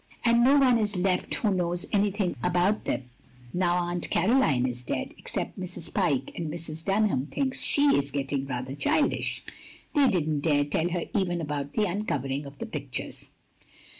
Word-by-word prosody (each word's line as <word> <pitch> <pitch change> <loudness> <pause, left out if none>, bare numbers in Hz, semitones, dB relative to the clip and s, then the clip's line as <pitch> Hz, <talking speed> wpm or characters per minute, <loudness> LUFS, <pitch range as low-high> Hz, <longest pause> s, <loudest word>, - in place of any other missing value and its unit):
And 235 0 +5
no 275 +3 +6
one 255 -4 +5
is 210 -2 0
left 180 0 0
who 210 -4 +1
knows 175 -1 0
anything 200 -2 +1
about 180 +4 +1
them 125 -1 -3 0.4
now 175 -1 +2
Atint 175 0 -3
Caroline 175 - +3
is 125 -1 -3
dead, 125 - -3
except - - -4
Mrs. 180 -3 -3
Pyke, 145 -10 +1
and 165 -2 -3
Mrs. 160 -1 -4
Dunham 195 -8 +1
thinks 265 - -1
she 285 0 +4
is 140 0 +1
getting 135 -1 -2
rather 130 0 -4
childish. 145 - 0 0.5
They 285 -3 +5
did 175 -8 0
n't 150 -2 0
dare 145 -2 +2
tell 160 +4 0
her 175 -1 -2
even 180 -4 0
about 145 -2 -3
the 215 - +1
uncovering 145 -8 -2
of 140 0 -12
the - - -5
pictures." - - -5
175 Hz, 170 wpm, -27 LUFS, 145-205 Hz, 0.5 s, no